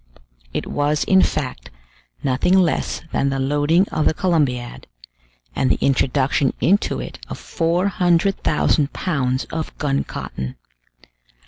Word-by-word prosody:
It - - -3
was, 145 +1 0
in 190 -1 +4
fact, 125 - -2 0.5
nothing 135 +8 +2
less 180 -4 0
than 140 - +1
the 135 - -1
loading 145 +7 +2
of 155 - -1
the - - +1
Columbiad, 140 -10 -1 0.7
and 130 - +1
the - - +2
introduction 135 0 +1
into 200 +4 +2
it - - -7
of - - -5
400,000 175 -3 +1
pounds 130 -7 -1
of 160 -1 -5
gun 140 -2 0
cotton. 65 0 -6
150 Hz, 120 wpm, -21 LUFS, 135-175 Hz, 0.7 s, in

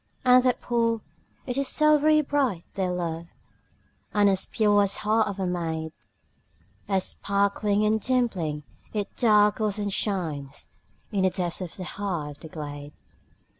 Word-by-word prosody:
And 250 0 +7
the 250 -1 +3
pool, 230 -2 0 0.4
it 255 +1 -2
is 275 - 0
silvery 305 0 +4
bright, 270 - 0
dear 185 -2 -1
love, 170 -2 -3 0.9
And 205 -1 +5
as 190 -1 0
pure 205 -2 +3
as 200 0 +2
the - - -4
heart 215 +1 +2
of 200 -1 -5
a 190 - 0
maid, 165 -3 -2 1.0
As 195 -2 +1
sparkling 200 +1 0
and 215 +1 +2
dimpling, 195 -13 0 0.3
it 210 -2 -3
darkles 210 -2 +3
and 205 -1 -2
shines 160 -11 -3 0.4
In 200 -3 0
the 190 - +4
depths 180 0 -2
of 180 -3 -6
the 185 - -5
heart 175 -7 -4
of - - -30
the - - -9
glade. 145 -2 -7
200 Hz, 155 wpm, -26 LUFS, 175-220 Hz, 1.0 s, And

